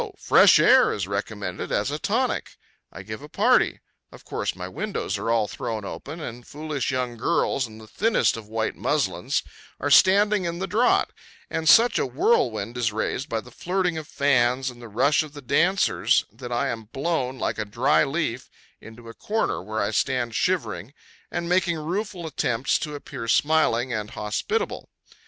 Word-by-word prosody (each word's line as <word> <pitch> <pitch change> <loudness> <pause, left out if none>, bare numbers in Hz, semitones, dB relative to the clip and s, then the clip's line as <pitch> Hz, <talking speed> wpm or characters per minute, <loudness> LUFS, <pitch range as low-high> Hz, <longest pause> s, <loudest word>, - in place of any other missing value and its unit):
fresh - - +6
air - - +6
is 95 -3 -3
recommended 100 -2 -4
as 105 +7 0
a 150 - -3
tonic. 240 - -1 0.3
I - - -9
give - - -7
a - - -11
party; - - +2 0.3
of - - -15
course - - -3
my - - -6
windows 210 - -3
are 110 +3 -3
all 115 -2 +2
thrown 110 -1 -5
open, 155 +10 -7
and 120 -5 -7
foolish 150 -3 -3
young 125 -2 -2
girls, 135 -1 0
in 110 0 -13
the 110 - -12
thinnest 215 - +1
of 110 -2 -9
white 110 0 -2
muslins, - - -1 0.4
are 145 - -1
standing 200 +3 +5
in 170 0 -3
the 190 - -2
draught; 245 - +2 0.4
and 160 0 0
such 235 +5 +6
a - - +1
whirlwind 120 - +1
is 115 -3 +1
raised 110 +5 -3
by 115 -1 -1
the 125 - -15
flirting 180 +4 -1
of 155 - -10
fans, 130 -3 +1
and 120 0 -15
the 120 - -10
rush 130 +8 +3
of 155 -2 -8
the 145 - -9
dancers, 170 +9 +2
that 120 +3 -9
I 120 - 0
am 115 -1 -5
blown, 135 +1 -2
like - - -2
a - - 0
dry 125 +10 +2
leaf, 135 -4 -2 0.3
into 115 +1 -13
a 115 - -9
corner, 220 - -2
where 110 +3 -3
I 100 - -1
stand 120 0 0
shivering, 120 - -1 0.3
and 170 - -3
making 175 -1 +1
rueful 180 +3 -4
attempts 135 -5 0
to 150 -1 -5
appear 140 -4 -7
smiling 130 -4 +2
and 105 -2 -3
hospitable. 110 - -3
130 Hz, 180 wpm, -24 LUFS, 115-170 Hz, 0.4 s, fresh